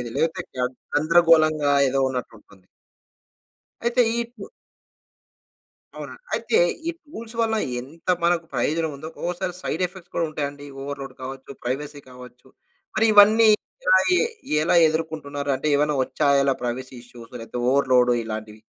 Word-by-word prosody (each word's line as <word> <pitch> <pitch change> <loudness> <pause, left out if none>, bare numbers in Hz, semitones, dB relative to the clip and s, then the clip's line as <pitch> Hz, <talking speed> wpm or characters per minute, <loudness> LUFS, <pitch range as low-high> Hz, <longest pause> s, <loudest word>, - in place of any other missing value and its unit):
లేకపోతే 165 0 0
గ - - -6 0.4
గందరగోళంగా 155 -2 +4 0.2
ఏదో 135 +1 0
ఉన్నట్టు 125 -3 -4
ఉంటుంది. 100 -3 -22 1.2
అయితే 235 +1 +2
ఈ - - -1 0.2
పు 200 - -8 1.5
అవునా? - - -8 0.2
అయితే 445 - +1 0.3
ఈ - - +1
టూల్స్ 230 -7 -9
వల్ల 225 -1 +1 0.3
ఎంత 150 +7 -16 0.2
మనకు 170 -1 +2
ప్రయోజనం 155 +6 0
ఉందో, 155 +3 -8
ఒకోసారి 180 +1 -3
సైడ్ - - -3
ఎఫెక్ట్స్ 180 -1 -16
కూడా 165 - +1
ఉంటాయండి. 145 -1 -5 0.2
ఓవర్‌లోడ్ 140 0 -6
కావచ్చు, 135 +1 -8
ప్రైవసీ 145 +4 -4
కావచ్చు. 125 -1 -14 0.5
మరి 220 +1 +3
ఇవన్నీ 215 +2 +7 0.4
ఎలా - - +6 0.2
ఈ - - +4 0.5
ఎలా 170 - +2
ఎదుర్కుంటున్నారు? 155 -3 -4
అంటే 135 +4 -3
ఏవైనా 150 +1 +1
వచ్చాయా 140 +1 +2
ఇలా 135 - +3
ప్రైవసీ 130 +2 -4
ఇష్యూస్ 120 -1 -14
లేకపోతే 115 +2 -6
ఓవర్‌లోడ్ 130 -3 +3
ఇలాంటివి? 110 -1 -7
145 Hz, 135 wpm, -23 LUFS, 130-170 Hz, 1.5 s, ఇవన్నీ